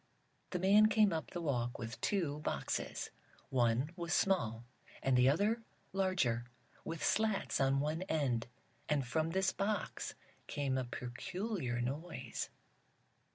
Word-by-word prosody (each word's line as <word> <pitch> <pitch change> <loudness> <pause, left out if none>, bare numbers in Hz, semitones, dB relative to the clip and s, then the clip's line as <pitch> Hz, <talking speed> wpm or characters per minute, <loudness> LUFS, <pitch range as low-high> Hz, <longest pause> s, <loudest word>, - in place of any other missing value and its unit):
The 180 - -1
man 200 +4 +6
came 215 -3 +4
up 160 - -2
the 175 - -4
walk 120 -5 0
with 115 -1 -6
two 165 -8 0
boxes. 75 - -2 0.4
One 125 +3 +2
was 170 -1 -1
small, 120 - +1 0.4
and 135 -1 +3
the 125 +1 +6
other 210 +10 +2 0.3
larger, 175 -12 +1 0.4
with 165 -1 -4
slats 215 -8 +2
on 135 0 +3
one 155 +4 0
end. 130 -8 +1 0.4
And 145 -3 +2
from 160 +5 0
this 190 +2 +2
box 205 0 -2 0.3
came 140 -2 -1
a 130 -1 0
peculiar 125 - -3
noise. 130 -1 -3
150 Hz, 130 wpm, -35 LUFS, 125-190 Hz, 0.4 s, man